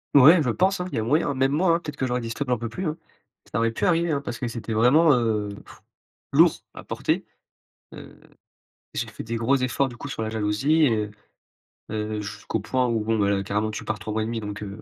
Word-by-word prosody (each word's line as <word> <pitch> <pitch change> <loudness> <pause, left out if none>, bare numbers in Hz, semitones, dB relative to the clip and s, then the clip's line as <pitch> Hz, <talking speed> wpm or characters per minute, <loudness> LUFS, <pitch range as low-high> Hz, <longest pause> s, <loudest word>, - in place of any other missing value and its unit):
Ouais, 155 +5 +8
je 135 - 0
pense, 185 - +2
hein, - - -2
il - - -4
y - - +1
a - - -1
moyen. 145 +5 +1
Même 135 +1 +2
moi, 165 +3 +3
hein, - - 0
peut-être 150 -3 -7
que 130 - -1
j'aurais 125 0 0
dit: 115 - -5
«Stop, 140 +4 -3
j'en 125 - +2
peux 115 +1 -4
plus», 180 +9 -4
hein. 155 - -3 0.5
Ça 105 - -1
aurait 115 0 +2
pu - - -2
arriver, 170 -1 +2
hein, 140 -2 0
parce 120 - -6
que 125 - -2
c'était 115 -1 -5
vraiment, 140 +8 +5
heu, 110 -4 0
pff - - -16 0.5
lourd - - +7
s - - -14
à - - -10
porter, - - -1 0.7
heu, - - -12 0.7
j'ai - - -2
fait - - -8
des 115 +1 -3
gros 115 +4 +2
efforts 130 +1 0
du 120 - -10
coup 140 - -7
sur 125 - -4
la 110 - -2
jalousie 110 +9 +2
et 130 - +4
heu - - -12 0.8
heu, 105 0 -2
jusqu'au 105 +2 -4
point 125 +4 0
où, 115 -2 0
bon, 110 +1 0
bah, 100 -1 +2
là, 100 -1 +1
carrément 105 +2 -1
tu 105 - -6
pars 110 -2 -2
3 110 0 -5
mois 110 0 0
et - - -2
1/2 115 0 -3
donc, 105 0 -6
heu, 100 +1 -8
115 Hz, 260 wpm, -24 LUFS, 110-140 Hz, 0.8 s, Ouais